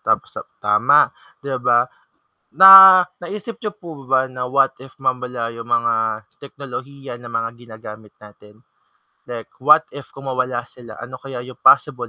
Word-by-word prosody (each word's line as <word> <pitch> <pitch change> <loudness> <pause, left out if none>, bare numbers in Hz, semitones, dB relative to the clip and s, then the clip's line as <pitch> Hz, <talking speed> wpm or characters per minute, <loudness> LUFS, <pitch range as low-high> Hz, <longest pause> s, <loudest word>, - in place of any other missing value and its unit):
Thumbs - - -2
up, - - -12
tama, 105 +8 +3 0.4
'di 140 -1 -5
ba, 120 0 +4 0.8
na 190 - +10 0.5
naisip 210 +5 -8
niyo 210 -4 -6
po 170 - -13 0.2
ba 130 -1 +3
na 125 - -6
what 135 -1 +2
if 135 - -21
mawala 125 -2 -3
yung 115 0 -10
mga 115 0 -1 0.5
teknolohiya 140 -1 -10
ng 120 -1 -12
mga 115 0 -4
ginagamit 110 -2 -13
natin? 105 0 -18 0.7
Like, 120 -2 -9
what 150 +4 +4
if 145 -1 -11
kung 135 0 -10
mawala 125 -1 -3
sila 120 -3 -14
ano 130 +1 -9
kaya 135 -3 -8
yung 130 - -13
possible 125 -5 +2
125 Hz, 155 wpm, -18 LUFS, 115-140 Hz, 0.8 s, na